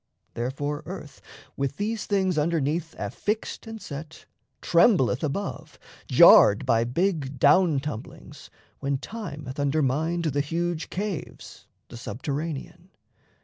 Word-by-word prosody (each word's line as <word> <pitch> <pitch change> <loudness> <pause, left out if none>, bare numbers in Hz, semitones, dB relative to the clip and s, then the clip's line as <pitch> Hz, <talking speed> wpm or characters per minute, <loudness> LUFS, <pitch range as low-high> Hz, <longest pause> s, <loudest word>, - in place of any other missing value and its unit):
Therefore, 145 +5 -3
earth, 150 -7 -8 0.3
With 140 0 -2
these 215 +2 -2
things 190 -3 +1
underneath 160 +1 0
affixed 215 +2 -3
and 225 0 -7
set, 160 -1 -9 0.3
Trembleth 170 - +3
above, 155 +7 -4 0.3
jarred 100 +1 +7
by 115 0 +3
big 145 0 -1
down 175 0 +4
tumblings, 135 -5 -8 0.3
When 140 0 -1
time 175 -5 -7
hath 130 +2 -7
undermined 155 +4 0
the 145 -2 +1
huge 165 +2 -2
caves, 195 -3 -6 0.2
The 120 - -9
subterranean. 140 +6 -5
150 Hz, 110 wpm, -26 LUFS, 135-175 Hz, 0.3 s, jarred